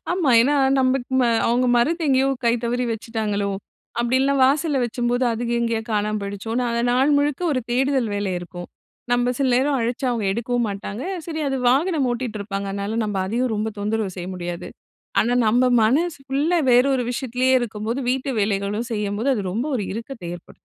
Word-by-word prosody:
ஆமா. 350 -7 +1
ஏன்னா 275 +5 +3 0.3
நம்பக்கு 255 -1 +1
ம - - +4 0.2
அவுங்க 245 +2 +2
மறந்து 330 +8 +1
எங்கேயோ 265 0 +3 0.2
கை 235 - +4
தவறி 245 +1 0
வச்சுட்டாங்களோ! 215 -2 -2 0.5
அப்படி 240 +2 +1
இல்லன்னா 275 +1 +2
வாசல்ல 285 +1 +2
வச்சம்போது, 245 +1 0
அது 235 +1 -3
எங்கேயோ 230 -1 0
காணாம 210 0 0
போயிடுச்சோன்னு, 205 +4 -3
அத 235 0 0
நாள் 265 +4 +3
முழுக்க 285 +1 0
ஒரு 255 - 0
தேடுதல் 260 -1 +1
வேலை 200 -2 -1
இருக்கும். 175 0 -9 0.4
நம்ப 245 0 +2
சில 275 -2 +2
நேரம் 270 +2 +2
அழச்சா, 240 +3 -1
அவுங்க 230 -4 -1
எடுக்கவும் 240 +2 -1
மாட்டாங்க. 200 +3 -5 0.2
சரி 315 -2 -4
அது 270 - -1
வாகனம் 285 +2 +2
ஓட்டிட்டு 240 -3 -4
இருப்பாங்க. 200 -1 -4
அதனால 200 +3 -3
நம்ப 210 -2 -3
அதையும் 235 +4 0
ரொம்ப 215 +1 -1
தொந்தரவு 205 -2 -2
செய்ய 180 0 -5
முடியாது. 175 -1 -5 0.5
ஆனா 240 +2 +1
நம்ப 240 +4 +3 0.2
மனசு 300 +10 +2
ஃபுல்லா 290 +6 +1
வேற 245 +1 +6
ஒரு 250 -2 0
விஷயத்துலேயே 255 +1 0
இருக்கும்போது, 225 +2 -3
வீட்டு 265 +1 -1
வேலைகளும் 205 +3 -1
செய்யும்போது, 210 +3 -2
அது 210 - -2
ரொம்ப 235 +8 -1
ஒரு 210 - -2
இறுக்கத்தை 230 -3 -7
ஏற்படுத்தும். 175 - -18
240 Hz, 175 wpm, -22 LUFS, 210-260 Hz, 0.5 s, வேற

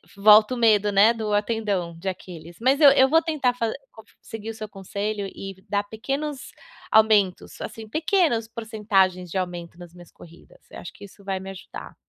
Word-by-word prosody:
volta 215 +4 +6
o - - -6
medo, 210 -3 +3
né, 205 +4 +5
do 220 -2 -4
tendão 205 -5 -1
de 190 +2 -3
Aquiles. 170 -2 -10
Mas 265 +5 +2
eu 285 - +10
eu 265 -1 +5
vou 325 +3 +4
tentar 300 -6 0
fa 230 -2 -2 0.2
co 220 - -15 0.2
seguir 225 -1 -8
o - - -5
seu 215 -1 -7
conselho 200 +1 -4
e 195 0 -8
dar 205 0 0
pequenos 275 +7 -5 0.4
aumentos, 215 -4 +2
assim, 220 0 -8
pequenas 310 - +1
porcentagens 205 -6 0
de 190 - -4
aumento 175 -2 -5
nas 175 -1 -12
minhas 175 -1 -15
corridas, 170 0 -17
eu - - -9
acho 175 - -9
que - - -12
isso 200 0 -17
vai 190 -1 -3
me 190 0 -8
ajudar. 190 - -11
210 Hz, 190 wpm, -24 LUFS, 190-230 Hz, 0.4 s, eu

